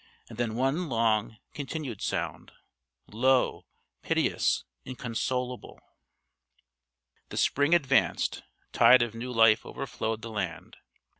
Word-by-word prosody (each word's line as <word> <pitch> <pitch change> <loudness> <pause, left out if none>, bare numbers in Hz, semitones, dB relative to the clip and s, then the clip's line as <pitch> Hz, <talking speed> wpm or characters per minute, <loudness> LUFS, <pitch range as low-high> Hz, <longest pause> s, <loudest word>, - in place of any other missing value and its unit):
And 115 0 -11
then 115 -2 -1
one 135 +7 0
long 115 -2 +1 0.2
continued 140 - -5
sound - - -4 0.6
low, 130 +4 +1 0.3
piteous, - - +1 0.2
inconsolable. 125 0 -4 1.5
The - - -7
spring 145 +4 +3
advanced; 135 -5 +1 0.3
tide 125 -1 +7
of 115 -2 -4
new 120 +2 -6
life 115 -2 +5
overflowed 115 -4 -4
the 115 - -6
land. 90 -4 -4
Dr. - - -29
120 Hz, 105 wpm, -28 LUFS, 110-130 Hz, 1.5 s, tide